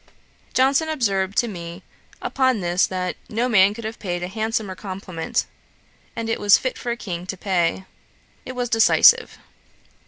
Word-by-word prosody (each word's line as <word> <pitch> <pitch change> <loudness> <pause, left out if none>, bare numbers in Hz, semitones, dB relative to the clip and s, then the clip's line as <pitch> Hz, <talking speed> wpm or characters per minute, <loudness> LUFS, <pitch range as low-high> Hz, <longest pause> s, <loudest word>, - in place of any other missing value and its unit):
Johnson 275 +5 +3
observed 200 -10 -1
to 240 - +3
me, 175 -2 -8 0.4
upon 260 -4 +1
this, 175 0 +1
that 185 -1 -3
'No 230 +3 0
man 205 -3 +4
could 230 - -8
have 220 +1 -6
paid 175 -3 -3
a - - -2
handsomer 220 0 -2
compliment; 185 -3 -4 0.7
and 230 -1 -4
it 225 - -1
was 205 -1 +6
fit 255 - -3
for 245 - -6
a 235 - -3
King 180 -5 -6
to 195 - -5
pay. 185 -1 0 0.6
It 255 - -7
was 245 -1 -2
decisive.' 240 - +5
205 Hz, 160 wpm, -22 LUFS, 185-235 Hz, 0.7 s, was